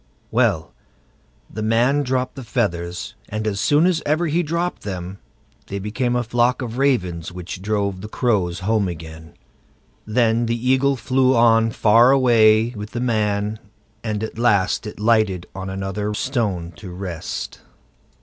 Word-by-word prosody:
Well, 105 -9 +1 0.7
the 110 - -7
man 120 +6 +2
dropped 130 -1 -1
the 135 - -8
feathers, 90 -7 -2 0.2
and 110 +1 -3
as 100 -2 -1
soon 145 - +3
as 180 -3 +2
ever 155 +4 +1
he 165 +2 +1
dropped 170 +2 -2
them 95 -1 -6 0.5
they 100 - -4
became 120 +5 -1
a 120 - +1
flock 120 +2 +1
of 120 +1 -5
ravens 90 -13 0
which 90 0 -7
drove 100 -2 -1
the 105 - -6
crows 100 -8 0
home 105 +1 +1
again. 80 -1 -9 0.7
Then 115 +1 +2
the 115 +1 0
Eagle 130 +3 +2
flew 130 +2 +2
on 115 -1 +4
far 115 +2 +5
away 115 -4 +5
with 105 0 -7
the 120 - -2
man, 105 -3 0 0.4
and 105 -2 -2
at 110 +1 -6
last 110 -3 +2
it 105 - -9
lighted 105 -5 +2
on 95 0 -6
another 95 +2 -3
stone 105 - -2
to 100 - -9
rest. 90 -2 -6
110 Hz, 150 wpm, -21 LUFS, 95-125 Hz, 0.7 s, far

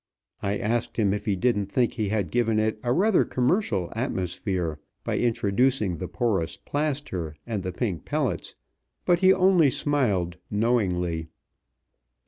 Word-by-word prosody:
I 100 +1 0
asked 115 +3 -1
him 100 -4 +2
if 105 - -4
he 100 - +2
didn't 105 -1 +1
think 120 +3 +1
he 110 -4 -2
had 105 -3 -1
given 115 -2 +2
it 110 0 0
a 120 - -1
rather 195 - +4
commercial 125 - 0
atmosphere 90 - -2 0.2
by - - -1
introducing 115 -3 +1
the 90 - -4
Porous 95 -9 -1
Plaster 140 - -3
and 110 -4 -2
the 95 - -3
Pink 90 -2 -2
Pellets, 135 - -2 0.5
but 175 -1 +4
he 185 +1 +6
only 185 -5 +5
smiled 125 - 0
knowingly. 90 -7 0
110 Hz, 140 wpm, -26 LUFS, 95-130 Hz, 0.5 s, he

